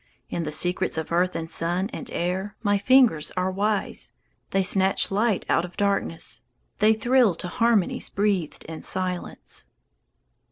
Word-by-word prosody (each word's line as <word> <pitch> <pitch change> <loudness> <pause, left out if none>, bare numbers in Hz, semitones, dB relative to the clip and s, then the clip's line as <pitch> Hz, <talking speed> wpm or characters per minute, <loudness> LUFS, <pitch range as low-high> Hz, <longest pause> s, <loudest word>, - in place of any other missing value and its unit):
In 170 - -2
the 150 - -3
secrets 175 +2 0
of 160 0 -4
earth 180 +2 +1
and 165 0 -3
sun 175 +3 0
and 250 - -6
air 190 +3 -2
My 205 -1 +2
fingers 240 - +4
are 185 +1 +1
wise; 205 +2 -2 0.4
They 195 0 +1
snatch 190 +1 +2
light 210 0 +1
out 165 - +2
of 180 0 -9
darkness, 195 - 0 0.4
They 215 +1 +5
thrill 240 -3 +3
to 180 - -3
harmonies 225 +1 +1
breathed 195 -5 -1
in 160 0 -7
silence. 185 -1 -3
190 Hz, 150 wpm, -25 LUFS, 175-210 Hz, 0.4 s, They